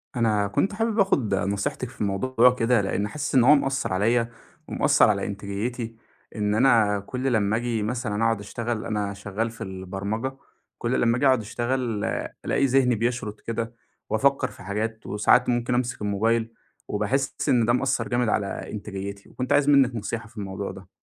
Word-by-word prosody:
أنا 105 Hz, -4 st, +2 dB
كنت 195 Hz, -, 0 dB
حابب 225 Hz, 0 st, -1 dB
آخد 140 Hz, -, +2 dB
نصيحتِك 100 Hz, +5 st, -2 dB
في 130 Hz, -, -5 dB
موضوع 125 Hz, +5 st, +3 dB
كده، 115 Hz, -2 st, +2 dB
لإني 100 Hz, +1 st, -1 dB
حاسس 145 Hz, +1 st, -3 dB
إن 125 Hz, -, +6 dB
هو 145 Hz, +5 st, +8 dB
مأثر 135 Hz, -6 st, 0 dB
عليَّ، 115 Hz, +5 st, +2 dB, 0.4 s
ومأثر -, -, +4 dB
على -, -, +1 dB
إنتاجيتي، 105 Hz, +4 st, -4 dB, 0.4 s
إن 105 Hz, -1 st, 0 dB
أنا 110 Hz, -4 st, +4 dB
كل 130 Hz, +6 st, -2 dB
لمّا 105 Hz, -1 st, +2 dB
آجي 115 Hz, -2 st, -1 dB
مثلًا 110 Hz, -1 st, -2 dB
أقعد 115 Hz, -2 st, +2 dB
أشتغل 115 Hz, +2 st, -4 dB
أنا 105 Hz, -2 st, -2 dB
شغّال 100 Hz, +3 st, -3 dB
في 115 Hz, -, -14 dB
البرمجة، 100 Hz, +6 st, -4 dB, 0.4 s
كل 120 Hz, +2 st, 0 dB
لمّا 115 Hz, +1 st, +3 dB
آجي 140 Hz, -, +1 dB
أقعد 130 Hz, -3 st, +4 dB
أشتغل 120 Hz, 0 st, -2 dB, 0.4 s
ألاقي 140 Hz, -, +2 dB
ذهني 130 Hz, -2 st, +3 dB
بيشرد 115 Hz, -1 st, -2 dB
كده، 115 Hz, 0 st, -4 dB, 0.4 s
وأفكّر 135 Hz, +5 st, +2 dB
في -, -, -13 dB
حاجات 110 Hz, +3 st, -3 dB
وساعات 110 Hz, +4 st, +3 dB
ممكن 120 Hz, 0 st, 0 dB
أمسك 120 Hz, -2 st, -1 dB
الموبايل، 110 Hz, +3 st, 0 dB, 0.3 s
وباحس 115 Hz, +7 st, -1 dB
إن 120 Hz, -3 st, +4 dB
ده 120 Hz, -, +3 dB
مأثر 130 Hz, +2 st, 0 dB
جامد 120 Hz, -2 st, +1 dB
على 100 Hz, -2 st, -2 dB
إنتاجياتي، 100 Hz, -1 st, -6 dB
وكنت 130 Hz, +2 st, -2 dB
عايز 145 Hz, 0 st, +4 dB
منِّك 135 Hz, -4 st, +5 dB
نصيحة 115 Hz, +1 st, -4 dB
في 110 Hz, +1 st, -20 dB
الموضوع 100 Hz, 0 st, -4 dB
ده. 95 Hz, -1 st, -12 dB
115 Hz, 170 wpm, -25 LUFS, 105-125 Hz, 0.4 s, هو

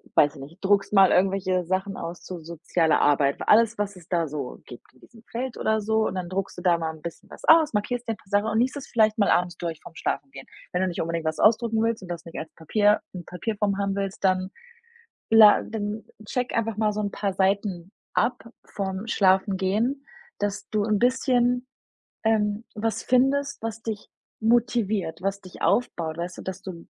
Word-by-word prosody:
weiß 145 Hz, 0 st, +4 dB
ich 140 Hz, -, -10 dB
nicht, 160 Hz, +9 st, -12 dB
druckst 200 Hz, 0 st, +3 dB
mal 195 Hz, -2 st, +7 dB
irgendwelche 185 Hz, -1 st, +2 dB
Sachen 190 Hz, +3 st, -1 dB
aus 170 Hz, +1 st, -6 dB
zu 180 Hz, -2 st, -7 dB
sozialer 165 Hz, 0 st, 0 dB
Arbeit, 140 Hz, -1 st, +3 dB
alles, 230 Hz, +1 st, +5 dB
was 205 Hz, -1 st, -2 dB
es 175 Hz, -2 st, -15 dB
da 170 Hz, -3 st, 0 dB
so 140 Hz, -3 st, -6 dB
gibt 120 Hz, -, -13 dB
in 130 Hz, -, -24 dB
diesem 230 Hz, -1 st, -18 dB
Feld 250 Hz, +1 st, -4 dB
oder 220 Hz, 0 st, +1 dB
so, 220 Hz, +1 st, +1 dB
und -, -, -4 dB
dann 180 Hz, -2 st, -4 dB
druckst 195 Hz, +1 st, -3 dB
du -, -, -6 dB
da 175 Hz, -2 st, +3 dB
mal 165 Hz, -1 st, -2 dB
'n 155 Hz, -, -14 dB
bisschen 170 Hz, +1 st, -8 dB
was -, -, -13 dB
aus, 320 Hz, -3 st, +6 dB
markierst 235 Hz, +3 st, -2 dB
dir 225 Hz, -, 0 dB
'n -, -, -11 dB
paar 195 Hz, -, -24 dB
Sachen 205 Hz, +1 st, +2 dB
und 220 Hz, 0 st, +1 dB
liest 260 Hz, +4 st, +1 dB
es 275 Hz, -, -8 dB
vielleicht 215 Hz, -1 st, +3 dB
mal 205 Hz, -, +3 dB
abends 175 Hz, 0 st, +2 dB
durch 165 Hz, -2 st, -4 dB
vorm 165 Hz, -, -13 dB
Schlafengehen. 135 Hz, -1 st, -4 dB, 0.3 s
Wenn 180 Hz, -, 0 dB
du 185 Hz, -, +2 dB
nicht 175 Hz, -, -3 dB
unbedingt 165 Hz, 0 st, -2 dB
was 155 Hz, 0 st, -1 dB
ausdrucken 225 Hz, 0 st, +3 dB
willst 230 Hz, 0 st, 0 dB
und 180 Hz, -, -10 dB
das 170 Hz, -1 st, -5 dB
nicht 165 Hz, -, -9 dB
als 160 Hz, -, -7 dB
Papier, 205 Hz, +6 st, +2 dB
in 180 Hz, -2 st, -7 dB
Papierform 200 Hz, +2 st, -2 dB
haben 200 Hz, -1 st, -1 dB
willst, 195 Hz, -1 st, -4 dB
dann 185 Hz, 0 st, +2 dB, 0.8 s
la 220 Hz, -2 st, +8 dB
dann 215 Hz, 0 st, -4 dB, 0.2 s
check 250 Hz, +2 st, -2 dB
einfach 225 Hz, -2 st, 0 dB
mal 215 Hz, -1 st, +1 dB
so 210 Hz, -, -3 dB
'n 205 Hz, -1 st, -1 dB
paar 200 Hz, -1 st, -2 dB
Seiten 190 Hz, -2 st, 0 dB, 0.2 s
ab 250 Hz, -, 0 dB, 0.2 s
vorm 195 Hz, +1 st, -4 dB
Schlafengehen, 200 Hz, +6 st, +1 dB, 0.3 s
dass 205 Hz, -1 st, -3 dB
du 210 Hz, -1 st, +1 dB
'n 210 Hz, -1 st, +1 dB
bisschen, 250 Hz, 0 st, +2 dB, 0.6 s
ähm, 215 Hz, 0 st, +1 dB
was 220 Hz, 0 st, -1 dB
findest, 275 Hz, +3 st, +2 dB
was 225 Hz, 0 st, -4 dB
dich 220 Hz, -3 st, -5 dB, 0.3 s
motiviert, 220 Hz, -7 st, +1 dB
was 195 Hz, +1 st, -2 dB
dich 185 Hz, -2 st, -13 dB
aufbaut, 165 Hz, -9 st, 0 dB
weißt 175 Hz, +1 st, -5 dB
du, -, -, -7 dB
dass 190 Hz, 0 st, -6 dB
du 180 Hz, -4 st, -8 dB
200 Hz, 205 wpm, -25 LUFS, 180-225 Hz, 0.8 s, la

